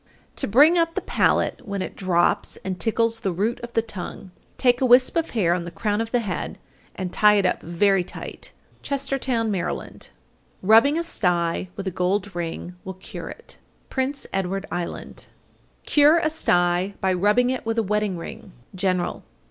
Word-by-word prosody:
To - - +2
bring 295 - +6
up 330 0 +1
the - - -1
palate - - +1
when 200 -2 -3
it - - -7
drops 175 -2 +1
and 185 -1 -3
tickles 230 +3 +1
the 195 -5 -1
root 210 +8 -1
of 240 -1 -9
the 225 - +2
tongue, 195 -2 -7 0.3
take 245 -1 +3
a - - +4
wisp 250 +1 +6
of 330 -1 0
hair 180 -7 +1
on 175 -1 -2
the 170 - -6
crown 210 +3 -1
of 225 - -3
the 245 - +2
head 195 -5 -4 0.4
and 185 -2 -5
tie 210 0 +5
it 200 -2 +2
up 180 - +1
very 185 +3 +2
tight. 175 - -8 0.3
Chestertown, 270 -5 -1
Md. - - 0 1.1
865. 185 - -5
Rubbing 275 +8 +6
a 335 - 0
sty 175 - 0
with 195 - -6
a 190 - -1
gold 185 +2 -1
ring 175 +1 -5
will 190 0 -7
cure 185 - -8
it. - - -10 0.3
Prince 275 +1 -1
Edward 195 +1 -2
Island. 175 -1 -5 0.6
866. - - -7
Cure 295 +2 +7
a 325 -2 +1
sty 180 - +1
by 190 -1 +1
rubbing 210 +7 +3
it 260 - -3
with 225 0 -2
a 225 - +2
wedding 210 -2 -1
ring. 205 +3 -9 0.2
_General. 185 -1 -1
205 Hz, 185 wpm, -23 LUFS, 185-245 Hz, 1.1 s, Cure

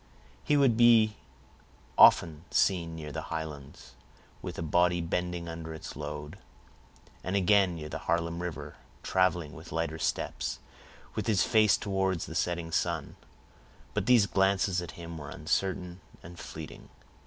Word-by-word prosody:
He 145 - +2
would 130 -5 +4
be 115 -3 +6 0.8
often 80 -1 +6
seen 85 -4 +1
near 75 -2 -7
the - - -4
Highlands, 75 -3 -7 0.5
with - - -6
a - - -3
body 90 +2 +2
bending 85 0 -2
under 80 -1 -6
its 80 - -8
load; 75 0 -6 0.8
and 95 +2 -2
again 100 -2 +4
near 75 -2 -6
the - - -5
Harlem 85 0 -1
River, 75 -4 -6 0.3
traveling 90 -5 +1
with 80 +4 -11
lighter 80 -1 -2
steps, - - -2 0.6
with - - -3
his 100 -5 +3
face 110 -2 +4
towards 95 -3 -1
the - - -8
setting 85 -1 -1
sun. 85 -3 -1 0.8
But - - -1
these 120 -5 +6
glances 95 -2 +2
at 85 - -7
him 85 -1 -7
were 75 -2 -8
uncertain 90 +4 -2 0.2
and 85 +1 -11
fleeting. - - -9
85 Hz, 145 wpm, -29 LUFS, 80-95 Hz, 0.8 s, be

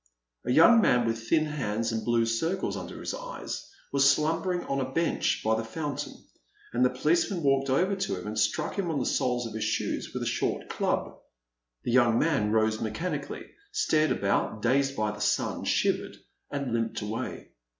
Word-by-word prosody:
A - - +2
young 225 - +7
man 125 - +3
with 115 0 -3
thin 155 -1 +4
hands 115 -7 -2
and 110 -1 -2
blue 120 -1 +2
circles 160 +12 -1
under - - -7
his - - -4
eyes - - -6 0.2
was 140 0 +5
slumbering 165 +4 +1
on 140 - -2
a 130 0 -3
bench 165 +4 0
by 110 0 +3
the 110 - -2
fountain, 145 +4 -4 0.6
and 120 +1 +2
the 125 - +5
policeman 165 +7 +1
walked 135 -1 +2
over 185 +9 +2
to 190 +1 -2
him - - -9
and 110 +1 -3
struck 155 - 0
him 180 -3 -1
on 160 - -1
the - - 0
soles 125 -3 0
of 115 - -6
his 110 -1 -3
shoes 110 0 -1
with - - -3
a - - -3
short - - -1
club. - - -1 0.6
The - - -1
young 120 -2 +4
man 140 -10 +2
rose 110 0 +2
mechanically, 115 +12 -3 0.3
stared 155 - +2
about, 105 -2 0
dazed 135 +2 +2
by 105 -1 0
the 105 0 -8
sun, 105 - 0
shivered, - - 0 0.3
and 140 -3 -3
Hmped 115 -2 -1
away. 105 +2 -5
130 Hz, 185 wpm, -28 LUFS, 115-160 Hz, 0.6 s, young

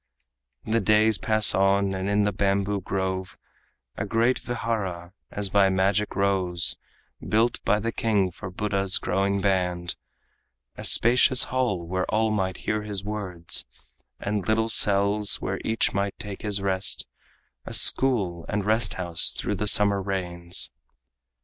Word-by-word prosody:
The 115 +1 0
days 105 0 +3
pass 110 -1 +6
on, 95 0 +1
and 95 +1 -3
in 105 0 +2
the 105 - 0
bamboo 100 0 -1
grove 95 0 -4 0.6
A - - -2
great 115 +5 0
vihara 100 -7 -4 0.2
as 100 -2 -3
by 100 -1 +4
magic 95 +2 0
rose, 95 -3 0 0.5
Built 115 +3 0
by 105 - +2
the 115 +2 -3
king 105 -5 0
for 90 - -9
Buddha's 100 0 0
growing 100 +1 -1
band, 90 -3 -1 0.8
A - - -9
spacious 125 +2 +4
hall 120 -9 -2
where 95 +2 -2
all 110 0 +1
might 95 -3 -2
hear 105 0 -1
his 105 -2 -4
words, 95 -5 -4 0.6
And 100 -1 -3
little 110 +1 +1
cells 100 -1 +2
where 95 +1 -4
each 110 +1 0
might 100 0 -2
take 100 -2 -8
his 100 -2 -1
rest, 95 0 +1 0.6
A - - -6
school 100 -11 +3
and 105 -1 -2
rest 110 +2 +2
house 85 -3 +1
through - - -3
the 105 - -2
summer 100 -1 +4
rains. 90 -2 -2
100 Hz, 145 wpm, -24 LUFS, 95-105 Hz, 0.8 s, pass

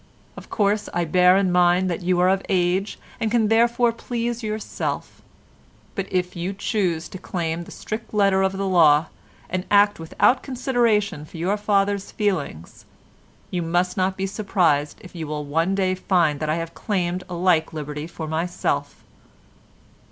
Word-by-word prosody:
Of - - -11
course, 205 0 0
I 175 -1 +1
bear 180 +3 +5
in 195 -2 +2
mind 180 +1 +3
that 170 - -3
you 180 0 +1
are 180 - +4
of 190 +1 +2
age, 185 +1 +1 0.2
and 225 - 0
can 225 -2 +2
therefore 235 +1 +3
please 235 0 -3
yourself, 215 -1 -4 0.7
but 195 -1 -4
if 180 0 -1
you 175 +3 -3
choose 190 -5 -1
to 185 - -8
claim 170 -2 -3
the - - -13
strict 220 +2 -6
letter 195 -2 +3
of 190 0 +1
the 195 - -1
law, 160 -4 +4 0.4
and 185 0 -2
act 205 -1 +4
without 200 +10 +2
consideration 235 - 0
for 155 - -11
your 180 +5 0
father's 200 -1 0
feelings, 165 - -3 0.7
you 180 - -1
must 175 +2 0
not 190 0 0
be 195 - -1
surprised 180 -8 0
if 185 - -13
you 165 -3 -5
one 155 +5 -1
day 190 -1 +1
find 175 -6 +1
that 155 - -2
I 155 - +2
have 165 0 -4
claimed 180 -3 -2
a 180 - -4
like 170 -3 +2
liberty 150 -1 -5
for 160 -2 -7
myself. 165 +3 -2
185 Hz, 165 wpm, -23 LUFS, 170-205 Hz, 0.7 s, bear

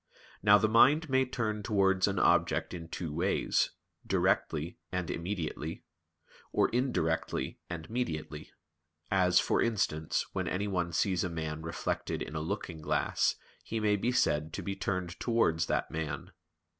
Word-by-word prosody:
Now 105 0 +7
the 110 - +2
mind 140 +7 +5
may 130 0 +4
turn 110 -4 -2
towards 95 -3 +2
an 100 -1 -1
object - - +2
in 85 -2 -6
two 80 -2 -5
ways: 90 +5 +1 0.3
directly 80 +2 0
and 90 -2 -2
immediately, 85 -3 -4 0.7
or - - +3
indirectly 120 -10 -1
and 85 -2 -5
mediately; 80 -10 -4 0.6
as, 90 -1 +4
for - - +2
instance, 80 -9 0
when - - -2
anyone 90 -3 -1
sees 95 0 +1
a 90 - -1
man 80 -2 -4
reflected 80 +1 -3
in 80 - -8
a 80 - -2
looking 85 -2 -4
glass - - +1 0.3
he 115 - -3
may 105 -1 +3
be 115 +5 0
said 80 -10 +1
to - - -4
be 100 -1 -3
turned 90 -3 -3
towards 85 -9 +2
that - - -1
man. 80 -3 -4
90 Hz, 145 wpm, -31 LUFS, 80-105 Hz, 0.7 s, Now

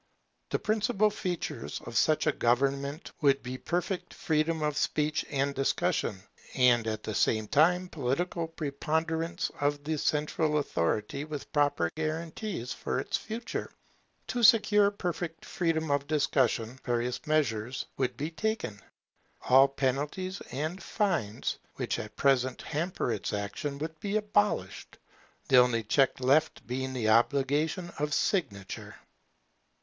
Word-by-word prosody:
The - - +1
principal 215 0 +1
features 175 - -4
of 120 - -8
such 155 +4 +3
a 155 - +4
government 140 +5 0
would 140 -2 +3
be 130 +1 -5
perfect 180 +4 -2
freedom 160 -2 0
of 150 -1 0
speech 150 +1 0
and 140 0 0
discussion, 120 -7 0 0.3
and 120 -3 +4
at 110 -1 -3
the 110 - -4
same 110 +1 +2
time 180 - +3
political 165 +3 -1
preponderance 160 +2 -2
of 145 0 0
the 155 0 -2
central 150 +1 +1
authority 105 - -1
with 150 0 -7
proper 145 - +2
guarantees 160 - -3
for - - -3
its - - -2
purity. 225 +1 -5 0.5
To 245 - -2
secure 210 -3 +6
perfect 175 -4 -4
freedom 160 -3 0
of 140 0 +1
discussion, 130 -5 +1
various 120 +4 -2
measures 130 -6 0
would 130 -2 -1
be 150 +4 -3
taken. 215 - -2 0.7
All 135 +2 +8
penalties 145 +8 -2
and 155 +8 -3
fines 170 - -1 0.2
which - - -2
at 105 0 -7
present 130 -2 +2
hamper 165 -4 -2
its 105 -2 -3
action 105 +9 -3
would 160 +2 -5
be 205 +3 0
abolished, 205 - 0 0.5
the 130 - +5
only 125 -2 +5
check 135 +6 +2
left 140 +5 +2
being 130 +1 -3
the 115 -4 0
obligation 140 - +2
of 150 -1 0
signature. 105 - -2
145 Hz, 130 wpm, -29 LUFS, 125-170 Hz, 0.7 s, All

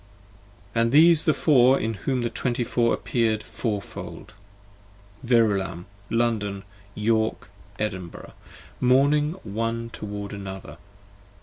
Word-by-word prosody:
And 115 0 +2
these 160 +2 +6
the 155 - +5
Four 135 -3 +5
in 115 +1 -1
whom 125 +5 -2
the 120 - -2
twenty 120 -1 -1
four 120 0 +1
appear'd 110 -3 0
four 105 -4 -3
fold: - - -9 0.9
Verulam, 105 -7 +1 0.2
London, 110 -4 0 0.3
York, 110 +1 0 0.3
Edinburgh, 95 -5 -5 0.5
mourning 145 +4 +3
one 115 +2 -3
towards 105 -1 -6
another. 95 -1 -8
115 Hz, 105 wpm, -25 LUFS, 105-125 Hz, 0.9 s, these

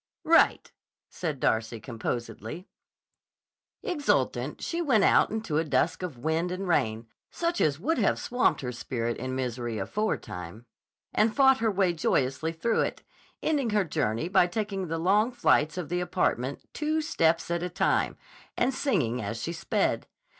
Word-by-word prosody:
"Right!" 330 +1 +4 0.4
said 155 -6 -3
Darcy, 115 0 0
composedly. 115 - -5 1.2
Exultant 295 -5 0
she 340 0 -2
went 250 -11 +3
out - - +5
into 215 -8 -1
a - - +1
dusk 140 0 0
of 170 -8 -5
wind 160 +7 -1
and 185 +1 -4
rain, 110 -9 +1 0.2
such 340 0 -1
as 145 -1 +2
would 290 - 0
have 205 - +2
swamped 245 +1 +1
her 125 -2 -3
spirit 120 -1 -3
in 130 +1 -4
misery 120 -3 -3
aforetime, 95 - -3 0.5
and 215 +1 +2
fought 265 -1 +5
her 225 - +2
way 190 -3 +2
joyously 140 -1 0
through 195 +8 0
it, - - -3 0.4
ending 285 -6 +1
her 210 -2 +2
journey 145 -3 -1
by 180 -1 +4
taking 195 -1 -3
the 165 +1 -2
long 205 +8 +3
flights 160 -9 +2
of 175 -5 -4
the 175 +1 0
apartment 140 -7 -1
two 310 +1 0
steps 165 - +1
at 170 0 0
a 180 - -2
time 175 - +1 0.4
and 255 +2 +2
singing 155 - 0
as 110 +2 -4
she 165 +8 -3
sped. 165 - -1
170 Hz, 155 wpm, -28 LUFS, -, 1.2 s, out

